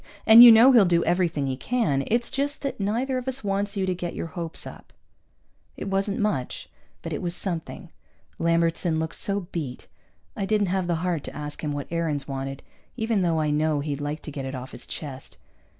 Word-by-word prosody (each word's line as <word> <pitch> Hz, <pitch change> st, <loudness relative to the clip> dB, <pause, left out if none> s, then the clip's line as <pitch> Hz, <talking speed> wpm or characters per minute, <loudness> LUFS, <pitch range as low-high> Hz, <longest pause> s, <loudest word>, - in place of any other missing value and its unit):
And 225 Hz, +2 st, +10 dB
you 240 Hz, -, +12 dB
know 230 Hz, +4 st, +8 dB
he'll 235 Hz, -5 st, +7 dB
do 170 Hz, -1 st, +2 dB
everything 170 Hz, -5 st, 0 dB
he 135 Hz, -1 st, -2 dB
can. 150 Hz, -, 0 dB
It's 235 Hz, +1 st, 0 dB
just 285 Hz, +2 st, -2 dB
that 275 Hz, -, -3 dB
neither 240 Hz, +6 st, -1 dB
of 250 Hz, -, -10 dB
us 265 Hz, -1 st, -2 dB
wants 200 Hz, +1 st, -1 dB
you 190 Hz, -, 0 dB
to 185 Hz, -, 0 dB
get 175 Hz, -1 st, -5 dB
your -, -, -4 dB
hopes 170 Hz, -3 st, -4 dB
up." -, -, -12 dB, 0.8 s
It -, -, -5 dB
wasn't 195 Hz, +1 st, 0 dB
much, 205 Hz, -12 st, -2 dB, 0.3 s
but -, -, -4 dB
it -, -, -3 dB
was 175 Hz, -1 st, -2 dB
something. 175 Hz, -2 st, -4 dB, 0.5 s
Lambertson 165 Hz, 0 st, +1 dB
looked 160 Hz, 0 st, -3 dB
so 200 Hz, 0 st, -1 dB
beat. 140 Hz, -7 st, -5 dB, 0.5 s
I 195 Hz, -, -3 dB
didn't 205 Hz, -2 st, +1 dB
have 190 Hz, -2 st, 0 dB
the 170 Hz, -, +1 dB
heart 170 Hz, -5 st, -1 dB
to -, -, -8 dB
ask 150 Hz, +1 st, -7 dB
him 150 Hz, -, -1 dB
what 145 Hz, -1 st, -4 dB
Aarons 160 Hz, -4 st, -1 dB
wanted, 135 Hz, 0 st, -5 dB, 0.3 s
even 220 Hz, -2 st, 0 dB
though 165 Hz, -3 st, +1 dB
I 150 Hz, -1 st, 0 dB
know 150 Hz, 0 st, +1 dB
he'd 145 Hz, -1 st, -4 dB
like 145 Hz, +2 st, -4 dB
to 150 Hz, -, -7 dB
get 140 Hz, -1 st, -5 dB
it 135 Hz, +1 st, -5 dB
off 130 Hz, +1 st, -7 dB
his -, -, -9 dB
chest. 135 Hz, -4 st, -7 dB
170 Hz, 210 wpm, -25 LUFS, 150-205 Hz, 0.8 s, you